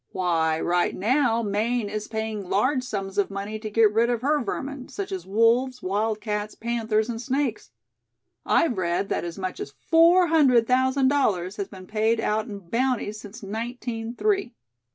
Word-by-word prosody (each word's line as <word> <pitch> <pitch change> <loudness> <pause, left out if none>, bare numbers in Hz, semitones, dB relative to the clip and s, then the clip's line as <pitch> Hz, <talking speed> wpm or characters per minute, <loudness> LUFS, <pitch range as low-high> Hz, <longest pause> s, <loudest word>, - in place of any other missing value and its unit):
"Why, 160 -3 +1
right 175 +1 +1
now, 235 +2 +2
Maine 215 +2 0
is 210 +1 -4
paying 220 -3 -4
large 255 +7 +2
sums 200 -5 -3
of 200 - +1
money 200 +2 -5
to 215 0 -5
get 215 0 +4
rid 230 +2 +3
of 240 -1 -1
her 295 -1 +2
vermin, 270 +4 -5
such 400 -1 -5
as 375 -2 -5
wolves, 235 +5 +2
wildcats, 210 +1 -2
panthers 225 -2 -1
and 230 -1 -4
snakes. 265 -1 -2 0.7
I've 245 - +2
read 175 +2 -1
that - - -1
as 170 -1 -6
much 185 -1 -4
as - - -5 0.2
four 340 +3 +6
hundred 265 -8 +5
thousand 260 +2 +2
dollars 205 -9 0
has 200 - -3
been 190 -2 -11
paid 220 +2 +1
out 215 0 0
in 200 -5 -9
bounties 235 -4 0
since 215 +2 -11
nineteen 230 +2 -5
three." 390 - 0
225 Hz, 170 wpm, -25 LUFS, 205-255 Hz, 0.7 s, four